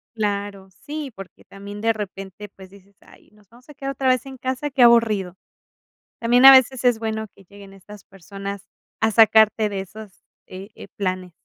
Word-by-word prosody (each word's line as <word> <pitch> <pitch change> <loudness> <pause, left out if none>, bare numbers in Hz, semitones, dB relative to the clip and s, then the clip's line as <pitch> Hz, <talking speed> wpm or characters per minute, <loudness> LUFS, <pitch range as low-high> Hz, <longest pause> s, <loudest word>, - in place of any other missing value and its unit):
Claro. 200 -2 -4
Sí, 290 +5 -8
porque 195 -3 -13
también 200 +1 -11
de 225 - +2
repente, 200 -1 -8
pues, 190 -1 -14
dices: 200 0 -21
"Ay - - -21
nos 210 -2 -26
vamos 240 +2 -21
a - - -12
quedar 275 0 -6
otra 270 -1 -3
vez 255 +1 +1
en 265 -1 -10
casa, 260 +3 -4
qué 270 -2 -2
aburrido". 220 -6 +3 0.8
También 240 +2 +2
a 270 - +12
veces 260 -1 +4
es 245 -3 +2
bueno 220 -1 -4
que 195 - -21
lleguen 200 +1 -15
estas 195 +1 -15
personas 195 +1 -9 0.3
a 220 - +1
sacarte 220 0 +4
de 200 - -5
esos, 195 0 -11 0.3
eh 190 +1 -10
eh, - - -12
planes. 185 -2 -4
210 Hz, 185 wpm, -21 LUFS, 195-240 Hz, 0.8 s, a